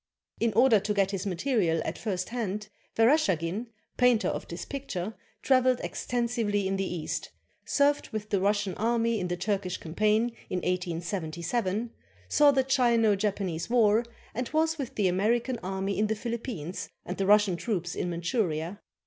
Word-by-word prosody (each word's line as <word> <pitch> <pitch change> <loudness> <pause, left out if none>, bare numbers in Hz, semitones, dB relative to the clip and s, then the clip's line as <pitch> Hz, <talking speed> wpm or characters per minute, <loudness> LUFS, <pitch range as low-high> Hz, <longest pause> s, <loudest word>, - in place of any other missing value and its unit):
In 230 0 +2
order 230 0 +6
to 210 +1 -2
get 195 -1 +2
his 195 0 -3
material 180 -3 +1
at - - -2
first 185 -5 -3
hand, 210 -3 -3 0.3
Vereshchagin, 225 - +2 0.3
painter 245 -3 +4
of - - -4
this - - -6
picture, 220 -8 -4 0.3
traveled 255 -2 +4
extensively 235 -5 -1
in 195 - 0
the 195 -1 -2
East, 170 -3 -3 0.4
served 290 0 +2
with 215 -1 -5
the 200 - +3
Russian 205 -1 +1
Army 230 0 +1
in 180 - -2
the 175 0 -2
Turkish 190 -1 -1
campaign 215 +7 +1
in 185 - -1
1877, 180 +5 -2 0.4
saw 295 -1 +5
the 270 -1 +2
Chino 240 -5 +3
Japanese 195 -4 -2
War, 225 -2 +4 0.3
and 245 +1 -3
was 320 +1 +1
with 265 -4 -4
the 205 -3 +2
American 230 +7 +1
army 190 +1 -2
in 215 - +3
the 220 - 0
Philippines 220 - -5 0.2
and 180 - -5
the 195 - 0
Russian 205 -2 +5
troops 175 -3 -2
in 175 - -2
Manchuria. 170 0 -2
210 Hz, 155 wpm, -28 LUFS, 185-235 Hz, 0.4 s, order